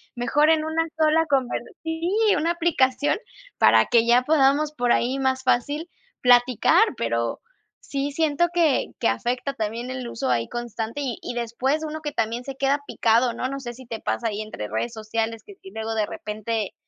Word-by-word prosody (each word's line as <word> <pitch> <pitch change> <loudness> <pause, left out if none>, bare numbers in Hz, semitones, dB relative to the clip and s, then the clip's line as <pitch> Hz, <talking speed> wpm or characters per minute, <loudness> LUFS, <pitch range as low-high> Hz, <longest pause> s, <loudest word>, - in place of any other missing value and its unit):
mejor 280 +6 +2
en 310 -1 +2
una 320 +1 0
sola, 320 +1 +3
conver", 265 -4 +1 0.2
sí, 325 +1 -2 0.3
una 330 +2 +1
aplicación 290 -6 +1 0.4
para - - +6
que 235 -2 +4
ya 245 +1 +5
podamos 295 +1 +3
por 245 -4 0
ahí 255 +3 0
más 260 -1 0
fácil 290 +6 0 0.3
platicar. 245 -1 +5
Pero 115 0 -1 0.4
sí, 280 0 -3
siento 315 +2 +1
que 330 -6 +2
que - - +1
afecta 245 - -1
también 230 0 -4
el 255 -2 -5
uso 230 - -3
ahí 115 -2 +1
constante 240 +2 -4
y 255 -5 -3
y - - -4
después 250 +6 -1
uno 310 +1 -6
que 295 -1 -4
también 230 +2 -1
se 275 - -6
queda 275 +2 +1
picado, 235 +2 +2
¿no? 250 - -3
No 275 - -4
sé 240 -3 -6
si 260 +2 -13
te 225 -2 -5
pasa 235 - -1
ahí 210 -1 -3
entre 215 - -6
redes 110 +3 -3
sociales, 225 +1 -3
que 405 - -13
si 385 0 -14
luego 220 -3 -4
de 215 -1 +1
repente, 215 0 -4
255 Hz, 185 wpm, -24 LUFS, 225-295 Hz, 0.4 s, para